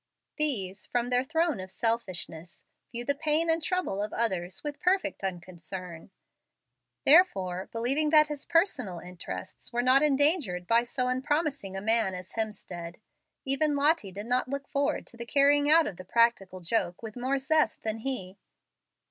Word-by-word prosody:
These, 205 - +1
from 245 0 -1
their 250 0 +3
throne 320 - 0
of 185 0 -7
selfishness, 185 -6 -3 0.3
view 240 0 -3
the 285 - +1
pain 310 +3 +2
and 325 +1 +1
troubles 345 - -1
of 210 - -5
others 190 -5 -2
with 295 -1 -5
perfect 375 - 0
unconcern. 180 -1 -6 1.0
Therefore, 190 - +4
believing 270 +7 +1
that 305 -1 +6
his 295 -2 -7
personal 270 - +1
interests 170 - -8
were 240 0 0
not 260 +2 +5
endangered 285 - +2
by 230 +4 +4
so 250 +1 -2
unpromising 270 - -1
a - - -4
man 220 -3 +2
as 180 +1 -8
Hemstead, 180 -6 -5 0.5
even 290 +2 +2
Lottie 285 - +2
did 205 +3 -7
not 250 +2 0
look 280 0 -4
forward 285 +1 -1
to 235 - -14
the 235 - -6
carrying 285 +2 +3
out 325 +1 +6
of 185 - -5
the 185 - -9
practical 195 -3 +1
joke 175 +1 -2
with 220 -2 -7
more 260 +3 -1
zest 305 +3 +1
than 220 0 -2
he. 200 -7 -4
240 Hz, 160 wpm, -28 LUFS, 190-290 Hz, 1.0 s, that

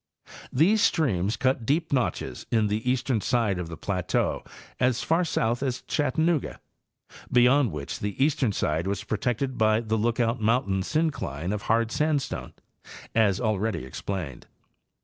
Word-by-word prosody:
These 195 +11 +3
streams 110 - +1
cut 130 -2 +1
deep 155 +6 0
notches 125 -3 -2
in 110 -3 +2
the 110 +4 -1
eastern 125 -3 0
side 110 -6 +1
of 90 - -4
the 80 - -7
plateau 90 -1 -1 0.4
as 125 -2 +1
far 165 +3 +2
south 120 -7 0
as 130 -2 -2
Chattanooga, 155 +2 0 0.7
beyond 125 0 +4
which 75 -2 -5
the 105 -1 -4
eastern 140 -6 +1
side 80 -2 -1
was 100 +1 -2
pro 110 -1 -3
tected 125 +1 -1
by 110 0 +4
the 110 -1 -1
Lookout 115 +1 0
mountain 105 -4 +1
syncline 100 - -1
of 105 - -3
hard 115 0 +2
sandstone, 150 +1 -1 0.6
as 105 -4 +3
already 110 - -1
explained. 75 +1 -5
115 Hz, 145 wpm, -26 LUFS, 100-130 Hz, 0.7 s, beyond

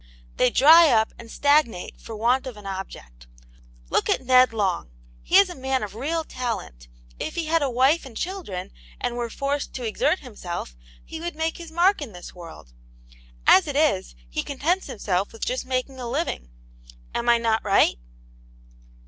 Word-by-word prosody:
They 250 - +4
dry 320 +6 +7
up 220 -3 +2
and 230 - -11
stagnate 285 -9 +1
for 225 - -8
want 245 +5 +1
of 245 -4 -7
an 205 - -12
object. 65 - -8 0.6
Look - - +1
at 260 - +1
Ned 255 0 +6
Long. 195 - -1 0.3
He 365 - +3
is 395 0 +7
a 360 - -7
man 265 -3 -2
of 205 - -6
real 310 +9 -2
talent; 215 - -5 0.3
if - - -4
he 335 - -2
had 325 +1 +2
a 280 - +1
wife 265 +7 +3
and 250 -5 -10
children, 345 - -5 0.3
and 240 - -2
were 240 -1 -3
forced 275 +4 -3
to 250 - -4
exert 290 - 0
himself, 180 - -7 0.3
he 320 - -7
would 345 -1 -4
make 320 +1 -2
his 335 -2 -9
mark 350 +3 +3
in 255 -8 -7
the 175 0 -10
world. 165 - -12 0.7
As 190 - +6
it 290 - -4
is, 280 - +1
he - - -3
contents 330 +7 -1
himself 200 -6 -2
with 225 - -5
just 255 +1 -3
making 260 +1 -2
a 245 -2 -5
living. 265 - -3 0.6
Am 240 0 -1
I 235 - +6
not 225 -1 0
right?" 195 - +3
250 Hz, 180 wpm, -24 LUFS, 210-300 Hz, 0.7 s, dry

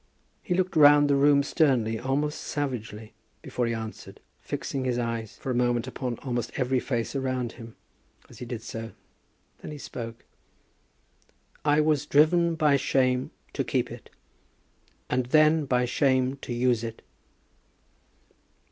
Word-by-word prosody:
He 180 - -1
looked 185 -1 0
round 145 -1 +7
the - - +4
room 140 0 +4
sternly, 125 -8 +1
almost 145 +3 -1
savagely, 115 -7 -4 0.3
before 120 -1 -2
he 115 - -1
answered, 110 -1 -8 0.2
fixing 135 -1 -4
his 125 -2 0
eyes 115 -2 -3
for 130 - -4
a - - 0
moment 120 -1 +1
upon 125 -2 -4
almost 120 -3 -2
every 130 0 +1
face 120 0 -3
around 130 -3 -1
him 115 -1 -12 0.5
as 120 - -15
he 125 - -6
did 120 -2 -5
so. 115 0 -7 0.7
Then - - -9
he 150 - -7
spoke. 115 -4 -8 1.4
"I 150 0 +4
was 150 -1 +1
driven 165 +3 +4
by 150 -3 +3
shame 130 -1 +1 0.2
to - - -1
keep - - -1
it, - - -10 1.0
and 125 -1 0
then 155 +2 +4
by 125 -2 +1
shame 130 +1 +1
to 135 - -8
use 120 -1 +1
it." 115 -1 -7
130 Hz, 145 wpm, -27 LUFS, 120-145 Hz, 1.4 s, round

